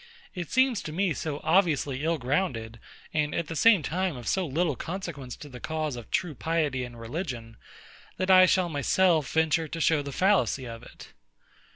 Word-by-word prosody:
It 175 -3 -5
seems 260 -4 +2
to 155 - -6
me 180 +1 0
so 150 -2 -4
obviously 155 -6 +2
ill 165 +1 +1
grounded, 125 -5 -2 0.3
and 150 -1 0
at 170 - -1
the 165 - -6
same 205 -1 +5
time 180 -2 -1
of 120 - -9
so 190 -3 0
little 155 +1 0
consequence 165 -6 -6
to 150 - -11
the 125 -3 -10
cause 155 -2 -3
of 120 -2 -9
true 180 -4 -1
piety 150 -3 -1
and 120 -1 -9
religion, 115 -3 -5 0.6
that 185 0 +1
I 185 0 +8
shall 185 0 +2
myself 160 0 +2
venture 160 0 +2
to 165 - -6
show 160 -1 +3
the 140 0 -6
fallacy 185 -6 +2
of 115 -1 -8
it. - - -13
155 Hz, 185 wpm, -27 LUFS, 135-180 Hz, 0.6 s, I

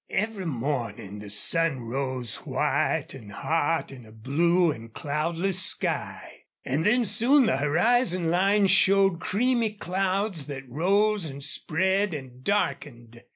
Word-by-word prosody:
Every 210 -3 -2
morning 115 -7 -4
the 105 0 -10
sun 150 +6 +2
rose 130 0 -4
white - - -1
and 110 -6 -11
hot 160 +8 -1
in 130 -3 -11
a 110 - -16
blue 165 +10 +1
and 115 -4 -9
cloudless 165 +8 -1
sky. - - -1 0.2
And 140 +5 -1
then 240 +5 +2
soon 240 +7 +3
the 130 - +1
horizon 175 - +2
line 195 +3 +3
showed 195 -1 +3
creamy 230 +3 0
clouds 190 -3 -2
that 135 -2 -7
rose 195 - +1
and 140 0 -8
spread 190 +5 0
and 130 -3 -10
darkened. 120 - -3
165 Hz, 130 wpm, -26 LUFS, 130-195 Hz, 0.2 s, soon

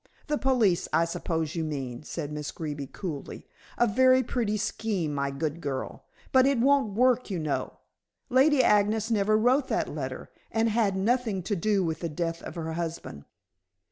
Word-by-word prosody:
'" - - -32
"The 300 - +1
police, 235 -10 +2
I 165 +2 +3
suppose 165 -1 -2
you 165 - -2
mean," 135 -5 -4
said 150 -1 -5
Miss 150 -1 -4
Greeby 145 -3 -5
coolly. 155 -2 -7 0.3
"A 240 - +4
very 255 +3 +4
pretty 225 -3 -1
scheme, 200 -6 -2
my 140 -1 -1
good 150 +4 -3
girl. 140 -4 -5 0.3
But 260 0 +5
it 275 -1 +2
won't 265 -4 +3
do, 250 -2 +2
you - - -2
know. 155 -3 -3 0.5
Lady 270 +2 +4
Agnes 210 +2 +2
never 215 0 +3
wrote 255 +5 +3
that - - -1
letter, - - -5 0.2
and 225 0 +2
had 210 -3 +1
nothing 220 -2 0
to 205 +3 -1
do 200 +2 +1
with 160 -2 -2
the 170 - -3
death 165 +2 -3
of - - -8
her 160 -1 -4
husband." 165 - -5
195 Hz, 175 wpm, -27 LUFS, 160-235 Hz, 0.5 s, But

